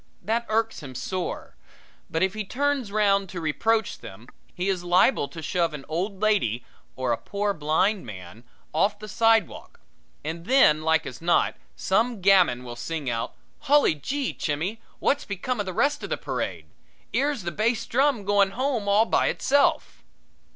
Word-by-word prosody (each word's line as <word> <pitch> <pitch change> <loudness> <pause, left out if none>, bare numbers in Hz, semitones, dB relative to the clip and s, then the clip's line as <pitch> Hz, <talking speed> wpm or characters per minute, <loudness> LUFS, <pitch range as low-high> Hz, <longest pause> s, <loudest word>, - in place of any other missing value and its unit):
That 230 +5 -1
irks 225 +1 0
him 135 -3 -9
sore; 185 +7 -4 0.5
but 160 +2 0
if 190 0 +1
he 215 - -3
turns 270 0 -1
round 200 -2 +2
to 180 - -6
reproach 220 +8 0
them 110 +6 -12 0.2
he 180 +2 -3
is 185 -3 -1
liable 175 - +3
to 160 +1 -9
shove 170 0 0
an 135 -2 -9
old 185 +5 -3
lady 195 - +1 0.3
or 130 -2 -1
a 115 - +1
poor 205 0 -2
blind 175 +6 +1
man 95 0 -10 0.3
off 200 +7 +2
the 215 +1 -9
sidewalk, 225 -2 +1 0.5
and 165 +2 -5
then, 215 - +5
like 160 0 +2
as 130 - -8
not, 170 +1 +2 0.2
some 225 +4 0
gamin 180 -10 +4
will 120 -1 -7
sing 140 +2 -3
out: 115 0 -3 0.2
"Hully 295 - +4
gee, 265 - -3
Chimmy, 175 +9 -3 0.2
wot's 285 - +1
become 210 +5 -3
of 205 - -2
the - - -2
rest 285 +10 +1
of - - -6
the - - -1
parade? - - -4 0.5
'Ere's 280 -6 0
the 175 - -3
bass 220 +7 0
drum 260 -4 +1
goin' 200 -1 +3
home 255 -6 0
all 210 +3 +5
by - - +2
itself." 285 +1 +1
195 Hz, 170 wpm, -25 LUFS, 160-225 Hz, 0.5 s, then